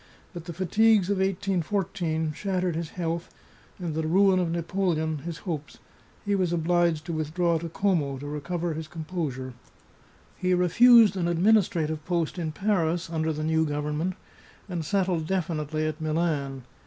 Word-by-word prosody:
But 170 -2 -8
the 170 - -6
fatigues 200 +3 +3
of 200 - 0
1814 180 -4 -1
shattered 185 0 -1
his 165 -1 -3
health, 170 -1 -2 0.5
and 175 -4 -4
the 160 0 -1
ruin 190 +2 +4
of 175 -2 0
Napoleon 165 -2 -1
his 165 +3 -6
hopes; 155 -5 -4 0.5
he 205 - +1
was 185 -3 +1
obliged 170 -1 +1
to 170 - -4
with 155 0 -3
draw 170 -2 +2
to 170 +1 -5
Coma 160 -7 0
to 140 - -8
recover 165 +4 -3
his 155 0 -5
composure. 155 -7 -4 0.8
He 185 0 +1
refused 220 +5 +6
an 175 -3 0
administrative 170 -4 +2
post 170 0 -1
in 160 -2 -2
Paris 175 -2 0
under 160 -1 0
the 155 0 -3
new 160 0 +2
government, 150 +4 -2 0.5
and 175 -4 -3
settled 180 -2 0
definitely 155 -4 -1
at 155 +1 -3
Milan. 155 -4 -1
170 Hz, 155 wpm, -26 LUFS, 155-185 Hz, 0.8 s, refused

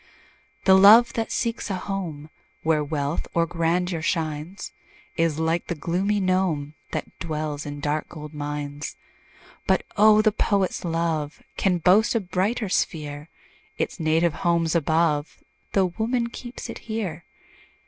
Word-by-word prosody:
The 190 - +7
love 210 +5 +8
that 225 -1 -2
seeks 230 -1 -2
a 195 - -1
home 175 -6 -5 0.3
Where 155 -1 +2
wealth 145 +1 -2
or 170 0 +3
grandeur 170 +1 0
shines, 160 +2 -3 0.4
Is 165 -3 +1
like 160 +1 0
the 175 - -2
gloomy 185 +7 0
gnome, 185 -6 0 0.2
That - - -5
dwells 155 -2 -3
in 145 0 -6
dark 150 +1 -1
gold 150 -1 -9
mines. 145 0 -5 0.7
But - - +3
oh! 215 +1 +6
the 215 - +4
poet's 200 -2 0
love 165 -3 -2
Can 185 -2 +2
boast 190 +8 +4
a - - +4
brighter 200 +4 -1
sphere; 150 -4 -2 0.5
Its - - -2
native 160 +1 +2
home's 170 -2 +2
above, 160 -2 +1 0.3
Tho' 185 -3 +2
woman 235 +1 0
keeps 240 0 -8
it - - -7
here. 190 -7 -3
170 Hz, 140 wpm, -24 LUFS, 155-195 Hz, 0.7 s, love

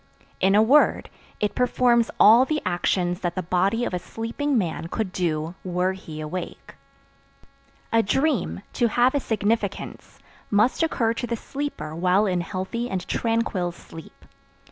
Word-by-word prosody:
In 195 +1 +3
a 215 - +6
word, 280 +7 +3 0.3
it 210 -1 0
performs 245 -2 +2
all 225 +4 +8
the 305 +3 -1
actions 175 0 0
that 175 -1 -3
the 185 - -2
body 195 +7 +1
of - - -4
a 180 - -1
sleeping 235 +8 -2
man 165 -5 -2
could 195 +2 -3
do 165 -3 -2
were 180 +1 0
he 160 -5 -9
awake. 155 +4 -6 1.2
A 230 - +5
dream, 265 - 0
to 240 - +2
have 245 +3 +3
a 285 - +1
significance, 215 -3 -2 0.3
must 215 +9 +2
occur 235 -8 +1
to 245 +1 -4
the 235 - -1
sleeper 270 - -5
while 185 +4 +2
in 180 -3 0
healthy 190 +7 -4
and 190 -2 -4
tranquil 225 -6 -1
sleep. 165 -1 -13
205 Hz, 150 wpm, -24 LUFS, 180-235 Hz, 1.2 s, all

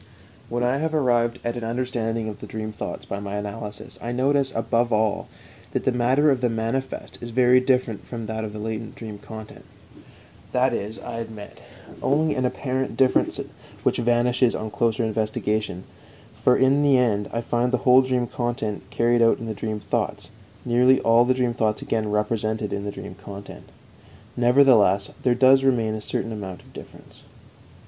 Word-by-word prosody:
When 120 +1 -1
I 125 +2 +2
have 160 +2 -1
arrived 120 -4 +2
at 120 0 -2
an 120 - -5
understanding 115 -1 -2
of 105 - -6
the - - -9
dream 110 0 -5
thoughts 105 - -6
by 100 - -4
my 100 0 -5
analysis 105 +1 -6
I 120 - -4
notice, 135 +2 +1
above 115 +1 +1
all, 110 -1 +1 0.5
that - - -1
the - - +2
matter 130 +5 +3
of 130 -2 0
the 125 - +2
manifest 115 +4 -3
is 120 - -6
very 125 +1 +5
different 125 -4 0
from 115 -2 -6
that 110 0 -4
of 110 - -4
the 105 - -8
latent 110 +1 -5
dream 110 -3 -8
content. 110 +1 -10 0.9
That 125 0 +2
is, 110 0 -3
I 115 - -6
admit, 110 -2 -9 0.4
only 155 +3 +2
an 130 - -1
apparent 130 +1 -2
difference 130 -1 +2 0.4
which - - +2
vanishes 120 +1 +2
on 110 0 -4
closer 115 +1 +1
investigation, 110 -3 -1 0.5
for 125 - +3
in 135 +2 +4
the 140 -2 +5
end 105 -5 +1
I 115 - -2
find 120 +1 0
the 125 - +2
whole 130 0 +7
dream 130 -2 0
content 120 -4 -3
carried 120 0 +2
out 115 0 +5
in 115 - -7
the 110 - -3
dream 110 0 -4
thoughts, 105 - -3 0.3
nearly 125 +2 +4
all 115 +1 +5
the 130 +1 +2
dream 125 -2 0
thoughts 110 -2 0
again 110 -2 -1
represented 105 0 -1
in 100 0 -3
the 100 - -3
dream 100 - -8
content. 100 +1 -11 0.7
Nevertheless, 120 -6 +4
there 125 -2 +2
does 135 +1 +5
remain 115 -5 +2
a 110 - -4
certain 115 - -3
amount 95 -4 -7
of - - -20
difference. - - -13
115 Hz, 180 wpm, -24 LUFS, 110-125 Hz, 0.9 s, whole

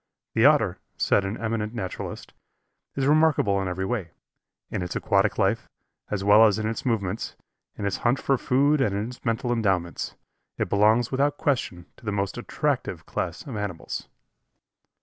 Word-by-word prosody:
The - - +4
Otter, - - +4 0.2
said 100 - +2
an 95 +3 -3
eminent 110 0 -2
naturalist, 95 -5 -5 0.6
is 135 - 0
remarkable 145 -10 +3
in 95 - -2
every 95 +1 -2
way; 95 -5 -2 0.6
in - - -2
its 90 -1 -4
aquatic 100 +2 +2
life, 100 +3 +1 0.4
as 100 -2 -2
well 105 +2 +7
as 105 - +1
in 110 0 -1
its 115 - -3
movements; 110 -4 -1 0.4
in 100 - -3
its 100 - 0
hunt 120 +3 +2
for 135 -2 +1
food 140 +3 +3
and 105 -7 +1
in 105 +3 -2
its 125 - -12
mental 115 +1 0
endowments. 95 -7 -1 0.4
It - - -1
belongs 110 +4 +3
without 145 +2 +1
question 95 - -1
to 120 - -17
the 105 - -1
most 100 -1 -2
attractive - - -2
class 85 -2 -4
of 130 - -6
animals. 100 -5 -4
110 Hz, 170 wpm, -25 LUFS, 95-120 Hz, 0.6 s, well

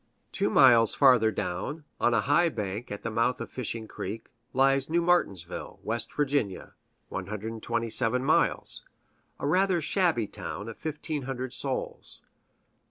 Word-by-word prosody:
Two - - 0
miles 115 -4 +6
farther 125 -5 +5
down, 110 - -4 0.2
on 120 - +3
a 115 - +3
high 155 +9 +3
bank 105 -2 -5
at 100 - -6
the 115 - -3
mouth 115 +3 +1
of - - -7
Fishing 115 -3 -4
Creek, 110 +3 -7 0.2
lies 135 +1 +2
New 170 +2 +2
Martinsville, 100 - -1
West 115 +1 -3
Va. 140 -9 -1 0.4
(127 115 +4 0
miles), - - +2 0.6
a - - -4
rather 185 +4 +2
shabby 165 - +1
town 100 +1 -7
of 115 - -8
fifteen 155 -1 -4
hundred 130 -1 -5
souls. 135 -1 -4
125 Hz, 135 wpm, -28 LUFS, 110-145 Hz, 0.6 s, miles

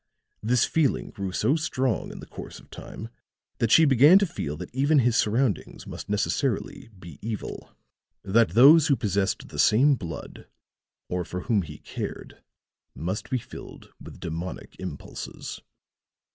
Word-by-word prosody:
This 120 +3 +3
feeling 155 -5 0
grew 100 -2 -4
so 135 +9 +2
strong 130 -8 -1
in - - -9
the - - -9
course - - -9
of - - -20
time 110 - -9 0.5
that 115 - +1
she 160 +7 +7
began 140 +6 +7
to 200 - +3
feel 75 - -5
that - - -8
even 140 +4 +3
his 125 -3 +3
surroundings 110 - 0
must - - -8
necessarily 110 +3 -1
be 85 -5 -12
evil, 110 -1 -6 0.5
that 115 +4 +2
those 150 +6 +8
who 140 - +4
possessed 100 -4 -1
the - - -8
same 135 +7 +5
blood, 85 -10 -7 0.6
or 90 0 -2
for 90 +2 -5
whom 110 -2 +1
he 75 -3 -9
cared, - - -7 0.5
must 95 +5 -4
be 130 - +1
filled 120 - -11
with - - -11
demonic 85 +3 -6
impulses." - - -7
115 Hz, 150 wpm, -26 LUFS, 95-135 Hz, 0.6 s, those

